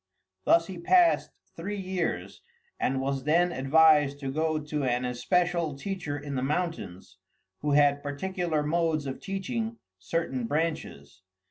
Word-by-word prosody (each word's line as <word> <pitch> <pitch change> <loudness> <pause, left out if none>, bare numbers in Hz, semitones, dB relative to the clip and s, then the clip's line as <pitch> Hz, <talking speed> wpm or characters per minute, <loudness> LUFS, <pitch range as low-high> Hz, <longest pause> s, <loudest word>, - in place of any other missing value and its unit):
Thus 165 0 +5
he 180 0 -8
passed 350 - +4 0.3
three 200 +5 -4
years, 185 -3 -3 0.4
and 130 +1 0
was 135 0 -2
then 175 +4 +3
advised 145 0 +4
to 135 -1 -3
go 155 +2 0
to 150 -1 -3
an 125 -1 0
especial 170 +5 0
teacher 150 -2 -4
in 145 0 -6
the 130 - -1
mountains, 135 - -3 0.4
who 145 -1 0
had 145 0 +4
particular 160 +2 -2
modes 160 -1 0
of 135 -1 -5
teaching 225 +4 -3 0.2
certain 135 -8 -2
branches. 145 - -3
155 Hz, 135 wpm, -28 LUFS, 140-175 Hz, 0.4 s, Thus